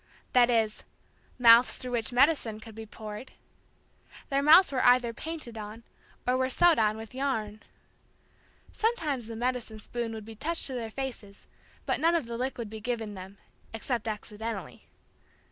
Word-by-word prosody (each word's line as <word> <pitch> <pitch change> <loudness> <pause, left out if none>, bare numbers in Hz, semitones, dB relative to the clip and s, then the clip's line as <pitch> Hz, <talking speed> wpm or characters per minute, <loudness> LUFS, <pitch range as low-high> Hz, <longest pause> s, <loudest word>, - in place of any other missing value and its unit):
That 245 -1 +6
is, 225 -3 +1 0.5
mouths 235 0 +7
through 250 - -5
which 235 0 -1
medicine 245 -4 +2
could 220 0 -12
be 220 0 -9
poured. 215 +3 -9 1.0
Their 275 0 +1
mouths 320 +5 +7
were 260 - 0
either 245 -1 +4
painted 300 -7 -6
on, 215 +2 -8 0.4
or 250 +1 +2
were 260 0 +1
sewed 345 +3 +4
on 215 -1 +2
with 225 +1 -9
yarn. 225 -6 -2 1.1
Sometimes 310 - -1
the 230 - -6
medicine 240 -2 -2
spoon 235 +2 -4
would 215 -1 -8
be 225 - -9
touched 325 +10 0
to 265 - -2
their 235 -3 -4
faces 225 -5 -7 0.4
but - - 0
none 335 +2 +3
of 325 -7 0
the 235 0 -6
liquid 245 -2 -3
be 215 +1 -8
given 225 -2 -3
them. 190 +1 -10 0.4
Except 230 0 -3
accidentally. 215 -1 -6
235 Hz, 160 wpm, -29 LUFS, 220-260 Hz, 1.1 s, mouths